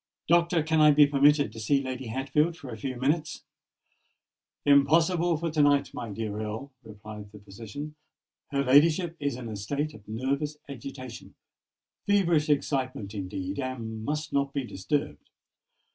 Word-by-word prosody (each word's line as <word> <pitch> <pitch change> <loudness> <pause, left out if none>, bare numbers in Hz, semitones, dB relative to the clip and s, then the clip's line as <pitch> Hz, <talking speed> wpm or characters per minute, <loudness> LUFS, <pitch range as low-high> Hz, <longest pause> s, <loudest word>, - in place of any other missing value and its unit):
Doctor, 170 -1 +3
can 160 0 +2
I 150 - +8
be 150 0 +7
permitted 145 -2 +4
to 110 - -10
see 135 +6 +2
Lady 130 -1 -5
Hatfield 140 +8 0
for 135 -7 -9
a - - -5
few 130 +3 -4
minutes?" 150 +4 -1 1.2
"Impossible 160 +4 +4
for 165 +1 -2
to 155 -1 +2
night, 145 -1 +3
my 115 - -5
dear 105 0 -4
Earl," 110 +6 -5
replied 105 -1 -10
the 105 - -12
physician. 110 +9 -8 0.6
"Her 140 -1 0
ladyship 160 +6 +4
is 140 -3 -1
in 125 -1 -7
a 110 - -5
state 140 +9 -3
of 105 -2 -15
nervous 140 +7 -2
agitation—feverish 140 - -3
excitement, 130 -7 -1
indeed,—and 110 +4 -4
must 150 +4 -3
not 140 0 0
be 140 - -1
disturbed. 95 - -3
140 Hz, 145 wpm, -28 LUFS, 110-150 Hz, 1.2 s, I